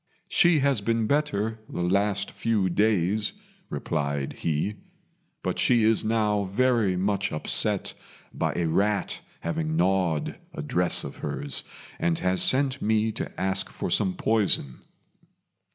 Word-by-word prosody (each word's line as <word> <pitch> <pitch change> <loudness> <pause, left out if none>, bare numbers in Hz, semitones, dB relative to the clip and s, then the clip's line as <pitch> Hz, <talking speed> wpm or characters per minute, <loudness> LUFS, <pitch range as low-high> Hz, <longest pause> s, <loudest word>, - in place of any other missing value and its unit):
"She 170 -4 +4
has 135 -5 +2
been 115 +1 +1
better 115 -6 0
the 85 - -3
last 100 +2 +1
few 110 -5 0
days," 105 - +1 0.4
replied 70 -3 -2
he; 85 +7 -2 0.7
"but - - -2
she 120 -2 +4
is 110 0 +3
now 105 -2 +1
very 110 -2 +2
much 100 +1 0
upset 75 - 0 0.4
by - - -1
a 85 - 0
rat 100 +4 0 0.2
having 80 -1 -2
gnawed 90 -3 +1 0.2
a - - -4
dress 90 +4 +1
of - - -7
hers, 70 -2 -4 0.4
and 85 -1 +1
has 90 0 0
sent 130 0 +3
me 110 +1 +2
to - - -5
ask 95 0 0
for - - -4
some 95 -2 +2
poison." 100 - +1
100 Hz, 135 wpm, -26 LUFS, 90-110 Hz, 0.7 s, She